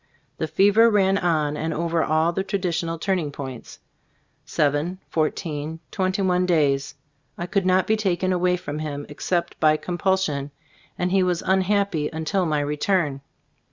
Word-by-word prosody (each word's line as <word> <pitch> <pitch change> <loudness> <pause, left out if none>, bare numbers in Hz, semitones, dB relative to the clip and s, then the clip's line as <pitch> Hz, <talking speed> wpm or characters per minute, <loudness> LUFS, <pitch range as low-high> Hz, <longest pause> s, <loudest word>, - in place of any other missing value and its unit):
The 160 - -1
fever 205 +7 +5
ran 195 -2 +3
on 155 -4 +1
and 160 +2 -2
over 165 0 0
all 160 +2 +2
the 190 - -1
tradi 195 -1 -1
tional 165 0 -2
turning 180 -5 -1
points, 135 -4 -8 0.7
seven, 150 +5 0
fourteen, 155 -1 -2
twenty 190 +1 0
one 180 -1 +2
days. 140 -5 +1 0.4
I 175 - -3
could 190 +1 0
not 185 0 +3
be 220 - +2
taken 185 -3 0
away 180 0 +2
from 150 -3 -5
him 145 -2 -4
except 170 +3 -2
by 155 -1 +4
compulsion, 175 -5 -1 0.5
and 180 0 -1
he 195 0 +3
was 180 -1 0
unhappy 190 -4 +1
until 160 +3 -1
my 150 -2 +1
return. 150 0 0
170 Hz, 155 wpm, -23 LUFS, 155-190 Hz, 0.7 s, fever